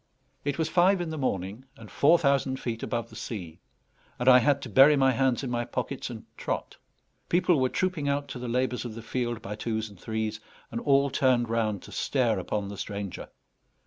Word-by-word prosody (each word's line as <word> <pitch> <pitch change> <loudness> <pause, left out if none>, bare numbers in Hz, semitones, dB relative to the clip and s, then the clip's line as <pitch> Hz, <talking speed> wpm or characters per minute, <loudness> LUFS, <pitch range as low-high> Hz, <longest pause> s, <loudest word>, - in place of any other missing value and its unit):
It 145 0 -2
was 160 -1 0
five 185 +3 +4
in 170 -2 -3
the 160 - -4
morning, 100 -1 -2
and - - -12
four 160 +5 +5
thousand 140 -3 +1
feet 115 -2 -4
above 115 -2 -3
the - - -12
sea; 95 -7 -6 0.6
and 125 - -3
I 125 -1 +9
had 140 +3 +3
to - - -5
bury 135 +7 +7
my 135 -1 +4
hands 130 +1 +1
in 130 - -3
my 120 0 0
pockets - - -4
and - - -8
trot. - - -4 0.5
People 175 -2 +3
were 130 - +2
trooping 175 -5 -1
out 140 0 -1
to 125 - -6
the 125 - -5
labours 125 +1 0
of 120 -3 -6
the 115 - -8
field 120 -1 -3
by 105 - -5
twos 110 0 -3
and 100 - -16
threes, 110 +1 -3 0.3
and 115 - -3
all 140 -1 +3
turned 125 -3 +2
round 110 -4 -1
to - - -12
stare 120 -7 +1
upon 100 +2 -3
the 100 - -7
stranger. 100 -2 -5
125 Hz, 210 wpm, -27 LUFS, 110-140 Hz, 0.6 s, I